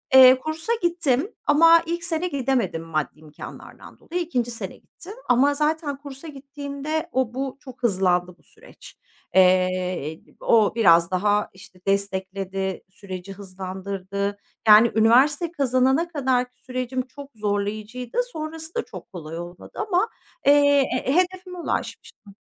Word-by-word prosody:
Eee, 260 0 +9
kursa 315 - -2
gittim 345 - +1
ama 330 +3 +6
ilk 340 +1 -3
sene 335 0 -1
gidemedim 255 - -1
maddi 155 -2 -3
imkânlardan 155 -1 -12
dolayı, 355 +2 -4
2. 245 -8 -2
sene 230 - -6
gittim. 380 +4 -13 0.2
Ama 270 +4 +4
zaten 300 -1 -1
kursa 280 +2 -10
gittiğimde 285 +3 -5
o 255 -3 0
bu 265 +1 -4
çok 260 -2 -13
hızlandı 180 -4 +1
bu - - -30
süreç. - - -16 0.4
Eee, 185 -4 +2 0.2
o 220 -2 +3
biraz 170 -6 +5
daha, 205 +3 +1
işte, 185 -1 -16
destekledi, 195 -1 -2
süreci 190 0 -8
hızlandırdı. 195 +1 -5 0.3
Yani 215 +2 +8
üniversite 265 +9 +4
kazanana 265 +1 +2
kadarki 255 -6 -1
sürecim 255 0 -3
çok 280 +2 -11
zorlayıcıydı. 215 +3 -3
Sonrası 320 -7 -7
da 465 - -1
çok - - -11
kolay 165 -3 -7
olmadı 175 +1 -10 0.2
ama, 410 +3 +1 0.4
eee, 285 0 +5 0.2
he 265 - 0
hedefime 365 0 0
ulaşmıştım. 205 - -5
250 Hz, 130 wpm, -23 LUFS, 195-295 Hz, 0.4 s, Eee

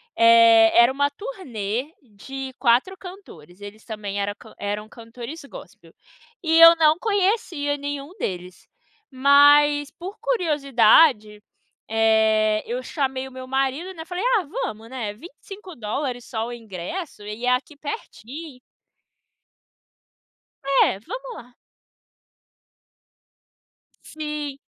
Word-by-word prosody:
é, 230 -1 +6
era 235 +2 +6
uma 285 +1 0
turnê 285 - -5
de 265 +3 -9
4 255 +10 +2
cantores, 205 - -13
eles 205 +2 -11
também 205 -2 -5
era 205 +1 -3 0.2
eram 205 +1 -4
cantores 235 +7 -10
gospel. - - -14 0.5
E 325 -1 +3
eu 330 0 +10
não 315 -1 +4
conhecia 385 -8 0
nenhum 285 +1 -6
deles. 180 0 -6 0.4
Mas 290 +2 +5
por 375 +5 -9
curiosidade, 275 - +3 0.5
eh, 220 -1 +2
eu 245 +2 -4
chamei 265 -1 -3
o - - -13
meu 260 0 -9
marido, 270 +7 -2
né, 320 -3 -9
falei, 360 +3 -5
ah, 395 - -1
vamos, 230 - -5
né, 235 -5 -5
$25 280 - -7
só 225 -1 -4
o 240 - -6
ingresso, 225 - -7
e 210 +4 -6
é - - +2
aqui 265 +4 -3
pertinho. 285 0 -8 2.1
É, 275 -7 +2
vamos - - -8
lá. 245 +1 -13 2.5
Sim. 300 -2 -6
265 Hz, 110 wpm, -23 LUFS, 225-315 Hz, 2.5 s, eu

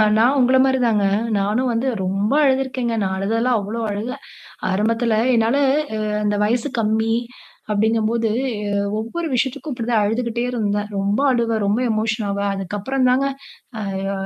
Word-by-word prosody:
அ, 215 - +5
நான் 250 +5 +4
உங்கள 255 +1 +4
மாதிரி 265 0 +2
தாங்க. 215 -4 +2 0.3
நானும் 210 +6 0
வந்து 240 +4 0 0.2
ரொம்ப 195 +5 0
அழுதுருக்கேங்க. 260 -3 0
நான் 190 -1 -1
அழுததெல்லாம் 225 +5 +1
அவ்ளோ 215 +4 -4
அழுக! 220 +6 -4 0.5
ஆரம்பத்துல 225 +3 +1 0.2
என்னால 230 +3 +2 0.4
அ - - -2 0.2
அந்த 210 0 +1
வயசு 240 +6 0
கம்மி 220 +1 +1 0.6
அப்டிங்கம்போது, 225 +1 +1 0.3
ஏ 205 - -2 0.3
ஒவ்வொரு 325 +10 -4
விஷயத்துக்கும் 270 +3 -1
இப்டித்தான் 230 -2 0
அழுதுகிட்டே 235 +2 -1
இருந்தேன். 210 -4 -1
ரொம்ப 200 +4 0
அழுவேன், 230 -3 0
ரொம்ப 205 +4 +1
எமோஷன் 215 0 -1
ஆவேன். 200 0 -1
அதுக்கு 195 +1 -4
அப்புறம் 255 +5 0
தாங்க 260 +2 +2 0.7
அ - - -2
யோ 195 - -1
225 Hz, 150 wpm, -20 LUFS, 210-250 Hz, 0.7 s, அ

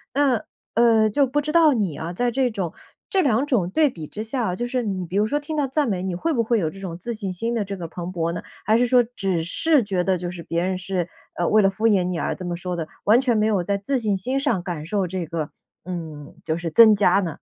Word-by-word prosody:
那， 265 -6 +2 0.3
呃， 225 -2 +4
就 280 +5 +3
不 285 +4 0
知 300 +1 -3
道 320 -3 +5
你 200 - -1
啊， 165 +2 -5
在 245 +7 0
这 260 +1 +1
种 185 -6 -3 0.4
这 385 - +2
2 270 -3 +2
种 210 -11 +1
对 295 +8 +3
比 160 -10 -8
之 215 +7 -6
下， 225 -5 -2
就 240 - -2
是 250 0 -1
你 190 -4 -3
比 180 +3 -7
如 210 - +3
说 290 - 0
听 300 +2 -5
到 290 -2 +1
赞 280 +1 0
美， 185 -3 -1
你 185 -2 -2
会 330 - -1
不 230 -3 +1
会 225 0 +1
有 160 - 0
这 195 - -11
种 180 -4 -6
自 235 +7 -5
信 205 -4 -4
心 230 +6 -2
的 225 - 0
这 200 - -5
个 170 -2 -5
蓬 175 0 -6
勃 170 -1 -1
呢？ - - -4 0.2
还 220 +2 +4
是 245 0 +3
说 245 0 +5
只 195 -8 -2
是 285 - +2
觉 195 -3 -1
得 190 0 +1
就 175 0 -4
是 170 -2 -8
别 170 +1 -1
人 185 0 -1
是， 180 -2 -3 0.3
呃， 175 - 0
为 215 0 +5
了 195 - +4
敷 215 +4 0
衍 200 -4 +3
你 180 -1 -2
而 - - -1
这 185 - -8
么 175 -1 -2
说 180 +1 -4
的， 165 -2 -4 0.2
完 220 +4 +5
全 245 -4 +1
没 215 - +2
有 200 -5 +1
在 200 +2 0
自 255 +7 -1
信 210 -3 +1
心 255 +8 -1
上 235 - 0
感 170 -5 -5
受 195 +2 -1
这 180 0 -3
个 160 -2 -4 0.3
嗯， 160 -5 -7
就 160 0 0
是 170 -1 -3
增 220 +2 +8
加 195 -1 +4
呢？ 185 -4 -1
200 Hz, 295 characters per minute, -23 LUFS, 175-240 Hz, 0.4 s, 增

